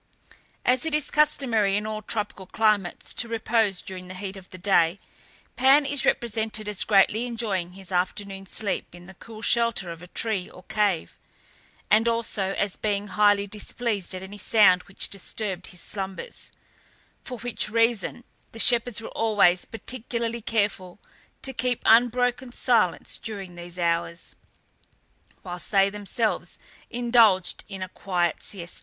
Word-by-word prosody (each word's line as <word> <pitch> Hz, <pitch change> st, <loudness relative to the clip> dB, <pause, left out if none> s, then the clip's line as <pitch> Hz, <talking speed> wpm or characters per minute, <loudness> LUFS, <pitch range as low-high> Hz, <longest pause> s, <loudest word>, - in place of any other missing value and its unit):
As 250 Hz, 0 st, +3 dB
it 320 Hz, -2 st, 0 dB
is 300 Hz, -1 st, -1 dB
customary 235 Hz, -9 st, +2 dB
in 210 Hz, -, -3 dB
all 215 Hz, 0 st, -4 dB
tropical 210 Hz, -3 st, -4 dB
climates 210 Hz, -5 st, 0 dB
to 235 Hz, -, 0 dB
repose 225 Hz, -4 st, +1 dB
during 185 Hz, -1 st, -8 dB
the 185 Hz, -, -8 dB
heat 190 Hz, +1 st, -6 dB
of 190 Hz, -2 st, -12 dB
the 185 Hz, -, -10 dB
day, 180 Hz, -1 st, +2 dB, 0.6 s
Pan 270 Hz, +3 st, +5 dB
is 280 Hz, 0 st, +1 dB
represented 220 Hz, -2 st, 0 dB
as 210 Hz, -2 st, 0 dB
greatly 215 Hz, +3 st, +3 dB
enjoying 205 Hz, -7 st, -2 dB
his 190 Hz, 0 st, -6 dB
afternoon 195 Hz, +2 st, -2 dB
sleep 200 Hz, -3 st, -2 dB
in 175 Hz, 0 st, -13 dB
the 190 Hz, -, -12 dB
cool 220 Hz, +3 st, -12 dB
shelter 230 Hz, -8 st, +2 dB
of 165 Hz, -1 st, -9 dB
a 180 Hz, -, -11 dB
tree 200 Hz, -1 st, -2 dB
or 180 Hz, -, -14 dB
cave, 210 Hz, -5 st, -1 dB, 0.7 s
and 220 Hz, +2 st, +5 dB
also 220 Hz, -4 st, 0 dB
as 200 Hz, -2 st, -1 dB
being 205 Hz, -1 st, -1 dB
highly 205 Hz, -1 st, +3 dB
displeased 210 Hz, -1 st, -3 dB
at 185 Hz, -, -6 dB
any 205 Hz, +2 st, -9 dB
sound 200 Hz, -6 st, +5 dB
which 195 Hz, -, -3 dB
disturbed 195 Hz, -1 st, -5 dB
his 180 Hz, -, -8 dB
slumbers, 195 Hz, -, -6 dB, 0.7 s
for 250 Hz, -, -6 dB
which 230 Hz, -2 st, -1 dB
reason 230 Hz, 0 st, +1 dB, 0.3 s
the -, -, -10 dB
shepherds 235 Hz, -1 st, +4 dB
were -, -, -7 dB
always 205 Hz, -5 st, +3 dB
particularly 235 Hz, 0 st, -4 dB
careful 205 Hz, -5 st, -1 dB, 0.5 s
to 265 Hz, -, -3 dB
keep 250 Hz, 0 st, -1 dB
unbroken 245 Hz, +2 st, +3 dB
silence 225 Hz, -8 st, +1 dB
during 200 Hz, -5 st, -7 dB
these 175 Hz, 0 st, -8 dB
hours, 170 Hz, 0 st, -1 dB, 1.1 s
whilst 180 Hz, -1 st, -2 dB
they 195 Hz, -1 st, +4 dB
themselves 210 Hz, +3 st, -2 dB, 0.3 s
indulged 230 Hz, -6 st, +3 dB
in 195 Hz, -2 st, -5 dB
a 185 Hz, -, -6 dB
quiet 175 Hz, -3 st, -1 dB
siesta. 175 Hz, -4 st, -5 dB
210 Hz, 150 wpm, -25 LUFS, 190-230 Hz, 1.1 s, Pan